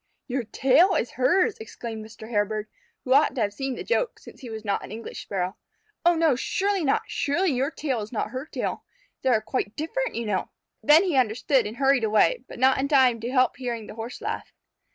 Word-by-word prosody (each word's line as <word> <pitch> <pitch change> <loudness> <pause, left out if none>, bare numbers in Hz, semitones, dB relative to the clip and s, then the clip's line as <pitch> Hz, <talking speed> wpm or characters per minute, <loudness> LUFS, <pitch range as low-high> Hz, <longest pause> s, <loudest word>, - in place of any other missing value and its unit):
"Your 250 -1 -2
tail 275 - +4
is 245 - 0
hers!" 365 - +2
exclaimed 230 - -7
Mr. 220 0 -11
Hairbird, 215 -1 -1 0.4
who 260 - +2
ought 290 +2 +4
to 250 - -1
have 205 -1 0
seen 270 +3 -3
the - - -6
joke, 485 +1 0
since - - -14
he 250 - -8
was 220 -1 -7
not 200 -1 -1
an - - -9
English 225 +2 -7
Sparrow. 185 -1 -3 0.5
"Oh, 345 0 +5
no, 320 -4 +3
surely 390 +8 0
not! 275 - +2
Surely 310 +5 0
your 265 +2 0
tail 275 -7 -2
is 210 - -7
not 215 -2 -2
her 260 +4 -5
tail. - - -3 0.4
They 260 - +1
are 225 -4 +3
quite 215 -2 -3
different, 460 +11 -2
you 235 - -2
know!" 200 -3 -1 0.3
Then 305 +4 +6
he 360 -6 0
understood 250 0 +2
and 220 +3 -8
hurried 270 -2 +3
away, 220 - +3
but - - -9
not 260 +2 +4
in 275 - +1
time 260 -5 +4
to 230 +2 -4
help 255 -1 +2
hearing 240 -4 -4
the - - -9
Horse 225 +2 -7
laugh. - - -4
255 Hz, 215 wpm, -25 LUFS, 220-295 Hz, 0.5 s, Then